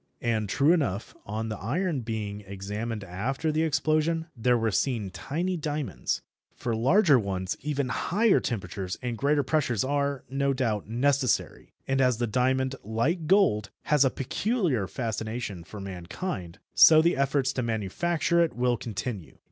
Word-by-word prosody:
And 110 -3 0
true 145 - +4
enough, 115 - -1
on 110 +2 -3
the 110 -3 -5
iron 155 - -1
being 105 -3 -4
examined 105 +3 -5
after 120 - -2
the 155 +1 +1
explosion, 160 +1 +1
there 125 +1 +2
were 115 -1 0
seen 105 0 0
tiny 175 - -2
diamonds. 150 - -3 0.3
For 115 -2 -2
larger 140 - +5
ones 95 -3 -2
even 140 -3 -1
higher 210 +3 +2
temperatures 95 -4 -4
and 120 -1 -2
greater 145 +4 +2
pressures 130 -6 +1
are, 140 0 -1
no 135 +2 0
doubt, 110 -6 -1
necessary, 130 +1 0 0.2
and 135 0 +1
as 125 -3 +3
the 120 - 0
diamond, 130 +3 +1
like 145 - -1
gold, 165 - +3
has 150 -2 +4
a 135 - +4
peculiar 150 - -1
fascination 110 -3 -4
for 105 +6 -10
mankind, 95 - -5 0.2
so 155 -1 +8
the 170 +2 +3
efforts 135 -1 +1
to 130 - -1
manufacture 155 - +1
it 165 - -2
will 120 0 +1
continue. 105 - -5
125 Hz, 150 wpm, -27 LUFS, 105-150 Hz, 0.3 s, so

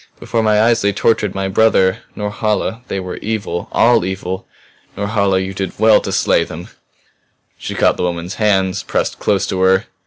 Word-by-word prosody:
Before 115 - -1
my 110 -1 +3
eyes 115 +1 +3
they 100 - +2
tortured 105 -1 +1
my 95 0 -1
brother. 95 -2 +3 0.2
Norhala 105 +2 -2
they 100 - -3
were 90 -1 -6
evil, 100 -5 -4
all 120 -5 +4
evil! 95 0 -4 0.5
Norhala 100 -2 +1
you 95 +1 -2
did 95 -1 -5
well 110 0 +5
to - - -4
slay - - +2
them!" - - -9 0.9
She - - -5
caught - - +2
the - - -2
woman's 90 +1 -3
hands, 95 -3 +2
pressed - - -2
close 100 -1 +1
to 95 - -3
her. 95 +1 +3
100 Hz, 175 wpm, -17 LUFS, 95-110 Hz, 0.9 s, well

